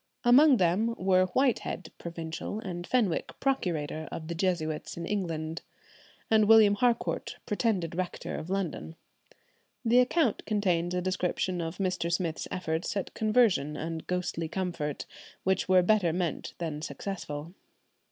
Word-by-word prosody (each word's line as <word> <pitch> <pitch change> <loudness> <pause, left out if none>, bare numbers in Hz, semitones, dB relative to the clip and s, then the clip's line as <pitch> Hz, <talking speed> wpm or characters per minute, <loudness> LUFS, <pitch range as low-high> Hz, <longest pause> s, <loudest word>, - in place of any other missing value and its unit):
Among 265 +3 +7
them 200 +6 +2
were 185 0 +3
Whitehead, 220 -6 0
provincial, 165 +4 -5
and 175 -4 -6
Fenwick, 185 -8 0
procurator, 160 - -1
of 160 0 -6
the - - -1
Jesuits 165 -4 -2
in 170 - -4
England, 165 -5 -3 0.7
and 215 -1 +5
William 220 -2 +7
Harcourt, 235 +3 0
pretended 205 -6 0
rector 180 +1 -4
of 160 - -6
London. 185 -4 -3 0.9
The 235 +2 +5
account 250 -1 +2
contains 180 -5 +1
a 180 - -1
description 185 -1 -1
of 165 +1 -4
Mr. 185 -3 -1
Smith's 170 -2 -1
efforts 170 +1 -2
at 195 - -3
conversion 215 - +2
and 160 0 -5
ghostly 180 -2 -2
comfort, 170 -5 -3 0.4
which 190 0 +1
were 185 -1 +6
better 195 -3 +3
meant 175 -1 -3
than 155 -3 -4
successful. 165 -3 -5
180 Hz, 135 wpm, -29 LUFS, 165-205 Hz, 0.9 s, Among